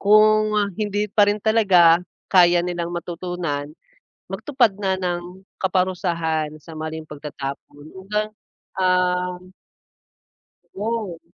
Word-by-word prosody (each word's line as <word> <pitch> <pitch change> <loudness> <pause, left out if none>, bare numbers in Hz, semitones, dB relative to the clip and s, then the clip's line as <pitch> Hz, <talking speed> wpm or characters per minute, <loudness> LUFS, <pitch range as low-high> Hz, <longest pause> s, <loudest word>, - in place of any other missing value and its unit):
Kung, 215 +1 +5
ah, 205 -1 +1
hindi 205 0 0
pa 205 -1 +5
rin 205 - +2
talaga 185 -7 +5 0.3
kaya 175 -1 +6
nilang 175 -1 -3
matutunan, 170 -4 -4 0.6
magtupad 245 - +1
na 190 -2 0
ng 180 +1 -4 0.2
kaparusahan 170 -4 0
sa 160 -2 -11
maling 160 0 -5
pagtatapon 145 0 -7
yun 190 0 -12
bang, 215 0 0 0.5
um 180 0 0 1.2
Go. 210 -4 -3
180 Hz, 105 wpm, -22 LUFS, 170-205 Hz, 1.2 s, kaya